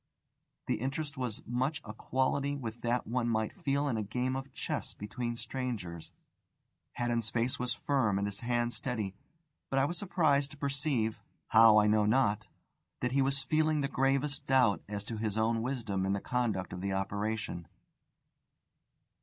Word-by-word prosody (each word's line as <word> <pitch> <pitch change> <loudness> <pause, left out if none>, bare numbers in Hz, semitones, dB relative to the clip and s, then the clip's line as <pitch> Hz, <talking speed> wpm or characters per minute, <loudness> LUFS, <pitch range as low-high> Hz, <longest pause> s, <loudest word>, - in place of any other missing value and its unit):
The - - 0
interest 140 +3 -2
was 125 -5 -4
much 130 +5 0
of 110 - -7
a - - -9
quality 135 +4 0
with 120 -4 -6
that 120 +1 0
one 120 +1 0
might 110 -1 0
feel 140 +1 +1
in 120 -5 0
a - - 0
game 125 +5 -1
of 135 0 -5
chess - - -3
between 120 +3 -4
strangers. 105 -11 -4 0.8
Haddon's 120 -2 0
face 120 +2 0
was 125 -1 -1
firm 130 -10 +1
and 100 - 0
his 100 -1 -4
hand 120 0 0
steady; 110 -7 -2 0.6
but 135 - 0
I 135 - +5
was 175 +4 -1
surprised 155 -8 +2
to 145 - -12
perceive 140 -5 0 0.3
(how 110 -1 +8
I 105 - +6
know 105 0 +4
not) 110 -3 +2 0.5
that 125 - 0
he 135 +1 +3
was 135 0 +1
feeling 155 +2 +2
the 140 - +1
gravest 135 +1 +1
doubt 130 -6 +4
as 105 -1 -3
to 115 0 -4
his 110 -1 -2
own 115 +1 +2
wisdom 115 -6 -1
in 95 - +2
the 100 - 0
conduct 110 -6 -1
of 90 - -5
the 100 0 -1
operation. 100 -1 -2
120 Hz, 170 wpm, -32 LUFS, 110-135 Hz, 0.8 s, how